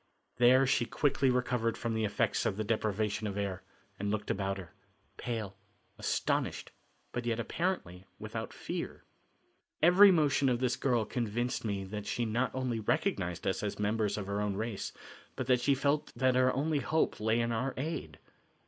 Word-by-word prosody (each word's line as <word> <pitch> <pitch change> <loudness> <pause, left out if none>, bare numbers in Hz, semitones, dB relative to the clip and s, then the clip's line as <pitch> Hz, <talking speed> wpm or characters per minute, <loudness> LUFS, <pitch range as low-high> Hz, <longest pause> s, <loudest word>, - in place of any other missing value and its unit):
There 125 +2 +6
she 125 -2 +2
quickly 140 -1 +2
recovered 125 -2 0
from 115 -1 -2
the 110 -1 0
effects 105 0 +1
of 95 - -2
the 110 - -1
deprivation 110 -1 -1
of 100 -1 -4
air 95 -2 -2 0.4
and 100 +1 -1
looked 105 0 -1
about 95 0 -1
her, 90 -4 -10 0.4
pale, 110 -5 -4 0.4
astonished, - - -1 0.4
but 120 -1 -3
yet 115 -1 0
apparently 115 - -2
without - - -5
fear. - - -5 0.8
Every 180 +6 +8
motion 145 -6 +3
of 120 -1 +1
this 125 -1 +1
girl 120 -5 +1
convinced 120 +2 -2
me 100 -3 -2
that 105 +2 -6
she 120 - -1
not 115 +4 0
only 130 -3 -1
recognized 90 -4 -1
us 95 -1 0
as 105 -1 -3
members 105 0 0
of 105 - -3
her 100 +1 -2
own 105 -1 -1
race, 110 0 -3 0.4
but 130 - -3
that 125 -1 +3
she 140 +2 +3
felt 140 +2 0
that 130 -1 +3
her 130 0 +4
only 150 +2 0
hope 160 +3 0
lay 110 +2 +2
in 115 0 0
our 125 +4 -1
aid. 155 +3 -4
115 Hz, 175 wpm, -32 LUFS, 105-130 Hz, 0.8 s, Every